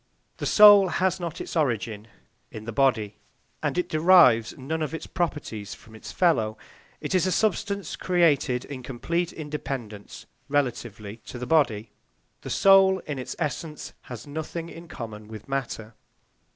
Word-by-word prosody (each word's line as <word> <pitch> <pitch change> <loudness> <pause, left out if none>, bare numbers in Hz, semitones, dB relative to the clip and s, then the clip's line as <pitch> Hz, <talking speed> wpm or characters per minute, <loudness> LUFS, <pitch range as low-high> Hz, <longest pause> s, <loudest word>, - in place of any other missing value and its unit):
The - - -3
soul 205 -2 +8
has 185 +1 0
not 170 -2 -5
its - - -6
origin 115 - -1 0.4
in 110 0 -9
the 115 - -4
body, 110 -5 +1 0.4
and - - -2
it 180 - 0
derives 155 -9 +5
none 155 +4 -4
of 155 +1 -2
its - - -7
properties 145 - -4
from 110 - -18
its 110 - -9
fellow; 110 - +1 0.4
it - - -4
is 185 0 +2
a - - 0
substance 200 0 -1
created 150 -8 +1
in 135 -3 -7
complete 170 +8 -2
independence 135 -9 -7 0.2
relatively 120 -7 -2
to - - -7
the 125 - -5
body; 120 -8 +1 0.5
the - - -8
soul, 195 -1 +5
in 145 -3 -4
its 130 - -6
essence, 155 0 -4 0.2
has 120 -3 -8
nothing 160 +3 -6
in 170 +1 -11
common 110 -6 -8
with 110 -1 -10
matter. 125 -5 -4
145 Hz, 150 wpm, -25 LUFS, 115-170 Hz, 0.5 s, soul